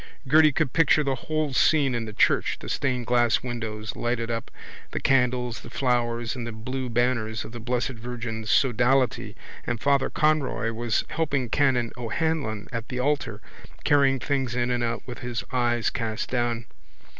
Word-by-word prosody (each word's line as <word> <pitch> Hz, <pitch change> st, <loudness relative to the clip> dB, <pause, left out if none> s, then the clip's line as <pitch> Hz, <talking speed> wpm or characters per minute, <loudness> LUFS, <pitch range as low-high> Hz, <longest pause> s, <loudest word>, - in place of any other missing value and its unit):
Gerty 155 Hz, +2 st, +6 dB
could 130 Hz, -, 0 dB
picture 155 Hz, -2 st, +4 dB
the 135 Hz, -1 st, 0 dB
whole 155 Hz, +3 st, -2 dB
scene 140 Hz, 0 st, +3 dB
in 120 Hz, -1 st, -2 dB
the 110 Hz, -, -6 dB
church, -, -, +2 dB
the -, -, -8 dB
stained 125 Hz, -3 st, -1 dB
glass 120 Hz, 0 st, +3 dB
windows 110 Hz, -3 st, -4 dB
lighted 120 Hz, -1 st, -1 dB
up, 115 Hz, -1 st, -3 dB, 0.4 s
the -, -, -3 dB
candles, 125 Hz, -3 st, +1 dB
the -, -, -10 dB
flowers 120 Hz, -2 st, 0 dB
and 120 Hz, -2 st, -5 dB
the -, -, -4 dB
blue 125 Hz, +4 st, -4 dB
banners 115 Hz, -2 st, 0 dB
of -, -, -9 dB
the 120 Hz, -, -7 dB
blessed 120 Hz, +2 st, -1 dB
Virgin's 115 Hz, -2 st, -5 dB
sodality 125 Hz, +1 st, +2 dB, 0.3 s
and 120 Hz, -2 st, -1 dB
Father 140 Hz, +1 st, +2 dB
Conroy 150 Hz, -6 st, +1 dB
was 115 Hz, 0 st, -1 dB
helping 140 Hz, -6 st, -1 dB
Canon 125 Hz, -5 st, +2 dB
O'Hanlon 120 Hz, -3 st, -2 dB
at 115 Hz, -1 st, -5 dB
the 125 Hz, -, -4 dB
altar, 145 Hz, +3 st, -1 dB, 0.4 s
carrying 140 Hz, -2 st, +4 dB
things 135 Hz, -3 st, -1 dB
in 125 Hz, 0 st, 0 dB
and 120 Hz, -1 st, 0 dB
out 115 Hz, 0 st, -2 dB
with 125 Hz, -2 st, -7 dB
his 125 Hz, -2 st, -3 dB
eyes 120 Hz, -2 st, +1 dB
cast 110 Hz, -1 st, -3 dB
down. 120 Hz, -2 st, 0 dB
125 Hz, 170 wpm, -26 LUFS, 115-135 Hz, 0.4 s, Gerty